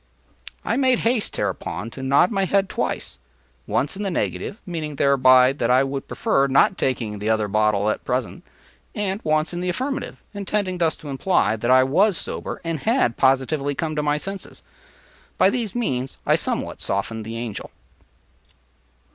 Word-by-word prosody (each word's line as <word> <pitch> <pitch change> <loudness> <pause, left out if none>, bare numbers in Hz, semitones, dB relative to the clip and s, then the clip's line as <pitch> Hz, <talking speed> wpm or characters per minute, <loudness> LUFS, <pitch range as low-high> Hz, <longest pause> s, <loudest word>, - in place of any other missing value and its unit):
” - - -16
I - - 0
made 260 -2 +3
haste, 230 -2 +1
hereupon, 95 +8 -3
to 135 - -8
nod 140 +8 +3
my 195 -2 +1
head 195 0 +1
twice—once 60 - -4
in 200 - -6
the 200 - -1
negative, 195 +4 -3
meaning 155 -4 -4
thereby 130 -2 +5
that 120 -4 -1
I 130 +2 +5
would 135 0 -4
prefer 135 0 +1
not 135 0 +4
taking 115 -5 -2
the 105 +2 -2
other 110 -1 +1
bottle 105 0 +1
at 110 - -1
present—and 190 - -5
once 155 +2 +1
in 175 - -3
the 180 - -1
affirmative, 265 +10 -3
intending 200 -2 -2
thus 165 -2 +2
to 150 - -10
imply 140 - +1
that 120 +2 -3
I 130 0 +6
was 185 +8 +3
sober - - -4
and 165 -2 -2
had 225 - +1
positively 135 +2 +1
come 160 0 -2
to 150 - 0
my 150 0 +1
senses. 195 +5 -7 0.7
By - - +5
these 235 -4 -3
means 135 - -2
I - - +4
somewhat - - -2
softened 110 +3 -2
the 115 +2 -6
Angel. 115 -3 -5
140 Hz, 165 wpm, -22 LUFS, 120-185 Hz, 0.7 s, I